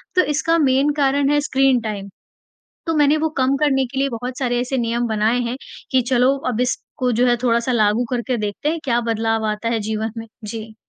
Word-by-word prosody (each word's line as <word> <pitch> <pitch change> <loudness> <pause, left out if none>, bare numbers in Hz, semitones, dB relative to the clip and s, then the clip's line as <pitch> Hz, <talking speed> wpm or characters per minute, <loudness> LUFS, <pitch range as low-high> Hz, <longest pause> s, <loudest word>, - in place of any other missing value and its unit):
तो 365 - +6
इसका 330 +2 +2
मेन 275 -1 +3
कारण 275 +1 +2
है 295 - +3
स्क्रीन-टाइम। 240 -8 0 0.8
तो 325 - +1
मैंने 295 +1 +4
वो 320 +1 0
कम 265 +1 +2
करने 270 -3 +2
के 265 +2 -5
लिए 275 0 +1
बहुत 245 +2 -5
सारे 245 -2 0
ऐसे 260 +1 -2
नियम 235 0 0
बनाए 220 +3 +1
हैं 240 +1 -3 0.4
कि 260 -1 +4
चलो, 255 +2 +3
अब 240 0 -1
इसको 250 0 -2
जो 245 +2 +2
है 240 0 +3
थोड़ा-सा 235 +1 +1
लागू 220 +1 +2
करके 245 0 -1
देखते 210 +7 -2
हैं, 330 +1 -2
क्या 240 -2 +1
बदलाव 225 0 0
आता 210 +2 -3
है 230 -1 0
जीवन 220 0 -2
में। 225 0 -6 0.2
जी। 220 0 -7
245 Hz, 205 wpm, -20 LUFS, 225-270 Hz, 0.8 s, तो